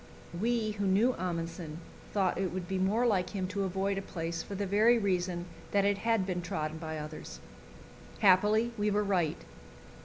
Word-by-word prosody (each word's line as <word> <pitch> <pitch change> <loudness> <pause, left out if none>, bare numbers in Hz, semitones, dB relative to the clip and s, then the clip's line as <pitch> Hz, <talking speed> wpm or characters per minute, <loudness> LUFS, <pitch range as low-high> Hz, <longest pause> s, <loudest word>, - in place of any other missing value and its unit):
We 220 +4 0
who 200 - +1
knew 215 +7 +4
Amundsen 170 -4 -4 0.3
thought 190 -3 +1
it 190 -2 0
would 180 -1 -4
be 190 +1 -1
more 210 +6 +2
like 185 -6 +2
him 190 -3 -2
to 200 0 -1
avoid 195 +1 -1
a - - -4
place 165 -3 -4
for 200 - -7
the 200 +1 -1
very 215 +5 +4
reason 180 -4 0 0.3
that 200 -1 +4
it 200 0 +2
had 225 -3 +1
been 180 -2 -2
trodden 155 -2 -3
by 160 -1 -4
others. 150 - -7 0.8
Happily 210 +4 +4
we 210 0 +2
were 210 0 +2
right. 180 -6 +1
190 Hz, 180 wpm, -31 LUFS, 175-205 Hz, 0.8 s, knew